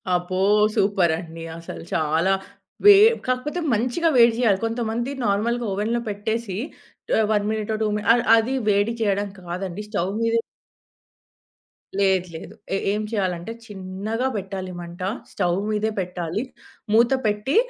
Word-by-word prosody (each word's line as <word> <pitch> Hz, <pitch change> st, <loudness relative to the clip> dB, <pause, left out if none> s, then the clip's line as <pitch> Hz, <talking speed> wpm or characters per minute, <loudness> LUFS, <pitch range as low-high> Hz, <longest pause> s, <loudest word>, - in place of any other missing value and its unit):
అబ్బో! 180 Hz, +1 st, -2 dB, 0.4 s
సూపర్ 195 Hz, -4 st, +3 dB
అండి! 165 Hz, -2 st, -9 dB, 0.2 s
అసలు 165 Hz, -, -8 dB
చాలా 160 Hz, +4 st, +2 dB, 0.5 s
వె 410 Hz, -, +11 dB, 0.3 s
కాకపోతే 255 Hz, +7 st, -1 dB
మంచిగా 250 Hz, +10 st, +1 dB
వేడి 235 Hz, -1 st, +7 dB
జేయాలి. 210 Hz, -6 st, +3 dB
కొంతమంది 230 Hz, +2 st, -2 dB, 0.2 s
నార్మల్‌గా 235 Hz, +4 st, 0 dB
ఓవెన్‌లో 220 Hz, +4 st, 0 dB
పెట్టేసి 210 Hz, 0 st, -3 dB, 0.6 s
ఆహ్, 220 Hz, -, +3 dB
1 205 Hz, -1 st, +1 dB
మినిటో 220 Hz, 0 st, -1 dB
2 215 Hz, -, +2 dB
మినిట్స్ 210 Hz, +2 st, +2 dB
అ -, -, +5 dB, 0.2 s
అది 230 Hz, +4 st, 0 dB, 0.2 s
వేడి 205 Hz, +3 st, +2 dB
చేయడం 205 Hz, -1 st, +1 dB
కాదండి 180 Hz, +2 st, -5 dB
స్టవ్ 195 Hz, -3 st, -1 dB
మీద 230 Hz, 0 st, +1 dB, 1.6 s
లేదు, 190 Hz, -2 st, +2 dB
లేదు. -, -, -9 dB, 0.2 s
ఎ -, -, +2 dB, 0.2 s
ఏం 210 Hz, -, -1 dB
చేయాలంటే 185 Hz, -2 st, -2 dB
చిన్నగా 205 Hz, +4 st, -3 dB
పెట్టాలి 190 Hz, -2 st, -4 dB
మంట. 170 Hz, +1 st, -10 dB, 0.3 s
స్టవ్ 180 Hz, -2 st, 0 dB
మీదే 215 Hz, +1 st, 0 dB
పెట్టాలి. 180 Hz, +3 st, -3 dB, 0.5 s
మూత 235 Hz, +3 st, +5 dB
పెట్టి 210 Hz, +6 st, 0 dB
205 Hz, 130 wpm, -23 LUFS, 185-225 Hz, 1.6 s, వె